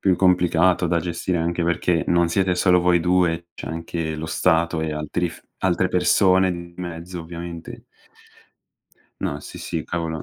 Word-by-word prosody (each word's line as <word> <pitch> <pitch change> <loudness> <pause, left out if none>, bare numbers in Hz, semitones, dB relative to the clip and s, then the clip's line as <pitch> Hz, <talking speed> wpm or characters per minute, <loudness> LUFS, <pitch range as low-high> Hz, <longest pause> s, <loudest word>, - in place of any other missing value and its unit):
Più 95 -3 +3
complicato 90 -1 +3
da 85 0 +2
gestire, 85 +1 -2
anche 85 +1 -1
perché 85 0 +1
non 85 -1 +3
siete 95 +1 +1
solo 90 -1 +4
voi 90 0 +3
due, 85 -1 +1
c'è - - -7
anche 80 -1 -4
lo 80 +1 -5
Stato 80 0 +1
e 80 -1 -2
altri 75 +3 -2
f - - -12 0.2
altre 90 0 +1
persone 95 +1 +3
di 85 0 -6
mezzo, 85 0 -6
ovviamente. 85 0 -8 1.4
No, - - -2
sì, - - -10
sì, 80 -2 -4
cavolo. 80 -2 -3
85 Hz, 160 wpm, -22 LUFS, 80-90 Hz, 1.4 s, solo